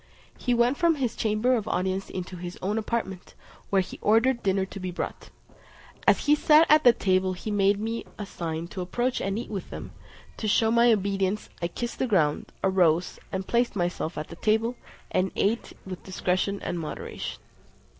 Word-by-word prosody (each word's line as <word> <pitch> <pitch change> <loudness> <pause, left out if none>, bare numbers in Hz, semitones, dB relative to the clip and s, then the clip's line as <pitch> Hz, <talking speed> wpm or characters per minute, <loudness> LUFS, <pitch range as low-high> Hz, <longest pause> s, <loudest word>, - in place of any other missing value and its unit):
He 245 - 0
went 240 +3 +3
from 335 -2 +3
his 250 -5 -1
chamber 220 +4 +1
of 220 -4 -2
audience 190 +1 -1
into 185 0 -5
his 175 0 -7
own 205 +4 0
apartment, 210 -5 -4 0.3
where 195 -1 +3
he 185 - -10
ordered 235 +4 +3
dinner 190 -1 +1
to 195 - -9
be 185 -1 -4
brought. 180 - -5 0.8
As - - +4
he 295 - +5
sat 305 +1 +6
at 295 -6 +6
table 185 -1 +2
he 200 +4 -5
made 200 0 +3
me 225 +2 -3
a 210 - -4
sign 165 -3 -4
to 185 - -5
approach 240 +8 -1
and 195 +1 -1
eat 235 - -5
with 195 -4 -5
them: - - -7 0.5
to 220 - -3
shew 220 +2 +3
my 235 +1 +5
obedience 195 -1 0
I 170 - +1
kissed 240 +7 -5
the 260 - +1
ground, 155 -9 +1
arose, 180 -3 +2
and 190 0 -3
placed 235 +1 +1
myself 175 -2 -2
at 150 - -5
the 170 - -8
table, 220 +4 +1 0.4
and 185 +1 +1
ate 225 +4 0
with 185 -2 -7
discretion 190 +1 -1
and 175 - -2
moderation. 155 - -5
200 Hz, 185 wpm, -27 LUFS, 185-235 Hz, 0.8 s, sat